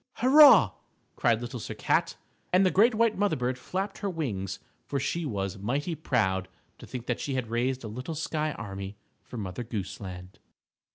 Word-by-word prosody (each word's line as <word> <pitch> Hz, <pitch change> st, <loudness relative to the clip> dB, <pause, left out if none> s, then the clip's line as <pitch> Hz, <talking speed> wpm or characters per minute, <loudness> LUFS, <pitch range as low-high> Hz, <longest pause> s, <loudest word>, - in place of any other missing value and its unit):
_ -, -, -43 dB
"Hurrah!" 275 Hz, +4 st, +7 dB, 0.4 s
cried -, -, +2 dB
Little -, -, -5 dB
Sir -, -, -6 dB
Cat, -, -, +1 dB, 0.4 s
and 185 Hz, +2 st, +5 dB
the 185 Hz, -, +3 dB
great 220 Hz, +4 st, +4 dB
white 225 Hz, -2 st, +2 dB
mother 205 Hz, -1 st, +2 dB
bird 125 Hz, 0 st, -2 dB
flapped 195 Hz, +7 st, -4 dB
her 200 Hz, -, -2 dB
wings, 105 Hz, -, -3 dB, 0.3 s
for 140 Hz, -, -1 dB
she 165 Hz, +4 st, -2 dB
was 100 Hz, -5 st, -3 dB
mighty 140 Hz, -, -1 dB
proud 95 Hz, -, 0 dB, 0.3 s
to -, -, -11 dB
think 125 Hz, -2 st, -6 dB
that 120 Hz, -, -2 dB
she 140 Hz, -, -3 dB
had 120 Hz, -4 st, -3 dB
raised 125 Hz, +2 st, 0 dB
a -, -, -5 dB
little 125 Hz, +9 st, -5 dB
sky 155 Hz, 0 st, -2 dB
army 100 Hz, -2 st, -7 dB, 0.2 s
for 125 Hz, -, -10 dB
Mother 100 Hz, +2 st, -4 dB
Goose 110 Hz, +1 st, -5 dB
Land. 90 Hz, 0 st, -9 dB
130 Hz, 185 wpm, -28 LUFS, -, 0.4 s, Hurrah